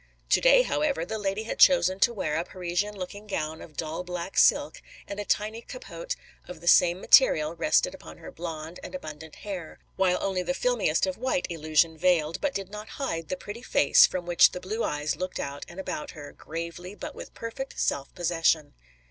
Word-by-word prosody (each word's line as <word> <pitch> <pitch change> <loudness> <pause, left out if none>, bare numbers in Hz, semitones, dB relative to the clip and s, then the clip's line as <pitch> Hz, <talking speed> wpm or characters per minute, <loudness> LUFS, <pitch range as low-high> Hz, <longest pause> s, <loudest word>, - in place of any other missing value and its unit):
To - - +5
day, - - +6
however, 295 - 0
the 220 +4 -4
lady 200 +1 -2
had 225 - -5
chosen 190 -9 +5
to 235 - +4
wear 190 -9 -2
a 165 - 0
Parisian 185 +4 -3
looking 200 +3 -7
gown 160 -5 -3
of 155 - -13
dull 165 +2 -3
black 180 +1 -6
silk - - +3 0.3
and 200 - -6
a 205 - -3
tiny 215 +3 -1
capote - - -7 0.3
of 180 -2 -9
the 175 - -11
same 175 +1 +5
material 155 - +5
rested 310 - +2
upon - - -12
her - - -10
blonde 165 - -7
and - - -8
abundant 155 - -8
hair, 185 -6 -6 0.2
while 185 -1 +3
only 190 -2 -1
the 270 +9 -2
filmiest - - +1
of 280 -4 -4
white 260 +2 0
illusion 160 0 +1
veiled, 165 -3 +2
but 290 -2 -1
did 195 -1 -4
not 210 +1 -8
hide, 165 - -3
the 185 - -2
pretty 205 +5 -8
face 145 - +5
from 180 -1 -4
which 175 0 +5
the 180 - -4
blue 215 +5 -3
eyes 150 0 -1
looked 185 +2 -4
out 140 0 -5
and 175 +2 -10
about 170 -5 -4
her, 145 -1 -9
gravely 170 +4 -7
but - - -7
with - - -10
perfect 250 +4 -6
self 140 0 -1
possession. 165 -3 +1
180 Hz, 200 wpm, -27 LUFS, 165-220 Hz, 0.3 s, day